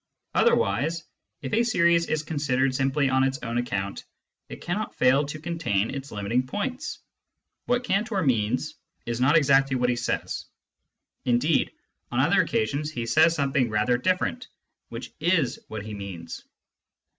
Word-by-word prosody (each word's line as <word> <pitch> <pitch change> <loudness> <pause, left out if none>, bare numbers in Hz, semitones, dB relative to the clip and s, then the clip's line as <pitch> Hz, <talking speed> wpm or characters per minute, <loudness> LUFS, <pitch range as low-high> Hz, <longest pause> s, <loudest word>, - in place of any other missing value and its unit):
Otherwise, 150 +12 +2 0.4
if 130 - -5
a 225 - +4
series 170 -7 +3
is 155 -1 -1
considered 135 -4 0
simply 135 +2 +1
on 130 0 +3
its 135 0 0
own 115 0 -1
account, 100 -5 -3 0.5
it - - -8
cannot 200 +5 -3
fail 130 +3 +4
to 155 +1 -6
contain 155 - -1
its 140 0 -6
limiting 105 +4 0
points. 245 - -3 0.7
What 245 0 +1
Cantor 200 -2 0
means 125 +2 0 0.3
is 120 +1 -3
not 145 +5 +5
exactly 135 -2 +4
what 125 -1 +1
he - - 0
says; 120 - -3 0.8
indeed, 125 +6 +2 0.4
on - - 0
other - - +4
occasions 140 +7 -1
he 120 -6 -4
says 160 +7 +4
something 135 -4 +1
rather 110 +3 +1
different, 185 - 0 0.4
which - - -8
is 160 -8 +1
what 110 -1 -6
he 110 - -6
means. 95 -5 -7
135 Hz, 145 wpm, -26 LUFS, 120-165 Hz, 0.8 s, not